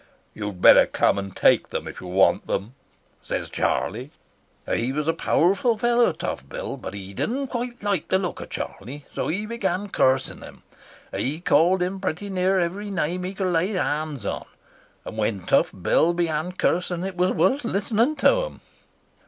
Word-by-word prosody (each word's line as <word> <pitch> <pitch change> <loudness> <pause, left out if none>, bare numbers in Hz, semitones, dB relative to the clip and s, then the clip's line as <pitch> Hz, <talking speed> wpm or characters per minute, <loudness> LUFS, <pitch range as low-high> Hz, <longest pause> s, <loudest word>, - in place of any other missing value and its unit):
"'You'd 105 -4 -6
better - - +8
come - - +2
and 100 -1 -7
take - - +4
them - - -4
if - - -8
you 90 - -8
want 95 +2 +3
them,' 100 +6 -2 0.5
says - - -4
Charlie. 120 +8 -1 0.6
"He 120 +3 0
was 150 +2 -2
a 165 - +3
powerful 195 +10 +2
fellow, 240 -1 +3
Tough 70 - -5
Bill, - - -5
but 95 - -7
he 100 0 -8
didn't 260 - -2
quite 240 -2 -4
like 200 -5 0
the 190 - +3
look 185 -2 -3
of - - -8
Charlie, 140 +8 -6
so - - -2
he 195 +7 -2
began 205 -3 -2
cursing 130 -6 +1
him. - - -12 0.5
He 145 +5 -2
called 180 +1 +3
him 190 +2 -3
pretty 195 +2 -3
near 190 +1 +2
every 190 +4 -2
name 180 -1 -1
he 185 +2 -4
could 185 -2 -1
lay 175 +6 +1
hands 150 - -2
on, - - -3 0.6
and 110 - -6
when 105 -2 0
Tough - - +2
Bill 170 +2 +2
began 165 0 -1
cursing 180 -1 0
it 190 -1 -5
was 180 +1 +2
worth 275 +7 +2
listening 230 +6 +1
to - - +3
him. - - -10
180 Hz, 175 wpm, -24 LUFS, 140-200 Hz, 0.6 s, better